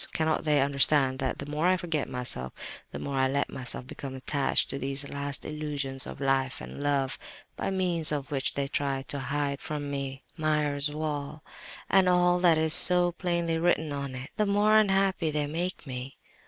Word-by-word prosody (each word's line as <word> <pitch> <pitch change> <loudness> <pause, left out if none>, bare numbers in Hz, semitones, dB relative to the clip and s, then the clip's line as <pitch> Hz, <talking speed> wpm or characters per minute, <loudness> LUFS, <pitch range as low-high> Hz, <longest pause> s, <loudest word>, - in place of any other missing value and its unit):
Cannot 160 0 0
they 150 -2 +4
understand 140 -1 +4
that 130 -2 -1
the 140 - -5
more 150 +4 0
I 185 0 +4
forget 165 -6 -2
myself, 120 - -2 0.4
the - - -6
more 140 -1 -3
I 130 0 +3
let 140 +2 0
myself 125 -1 -3
become 135 0 -7
attached 135 +1 +1
to 135 - -4
these 140 +1 -2
last 140 0 -2
illusions 145 -3 -3
of - - -8
life 135 -1 +1
and - - -8
love, 140 -2 0 0.4
by - - -2
means 180 -5 +2
of 145 -2 -3
which 135 -2 -1
they 140 -1 -1
try 140 -1 -1
to 140 0 -2
hide 140 +1 -2
from 145 -1 -4
me 135 -1 -4
Meyer's 150 -2 +1
wall, 150 0 -4 0.4
and 190 -1 +4
all 180 0 +4
that 175 -3 +5
is 160 0 +1
so 180 0 +4
plainly 170 -2 -1
written 160 -2 +2
on 140 -2 -4
it—the 135 +11 -2
more 205 +2 +4
unhappy 195 -5 +2
they 150 -1 0
make 170 +4 -3
me? 130 0 -6
145 Hz, 180 wpm, -28 LUFS, 135-165 Hz, 0.4 s, that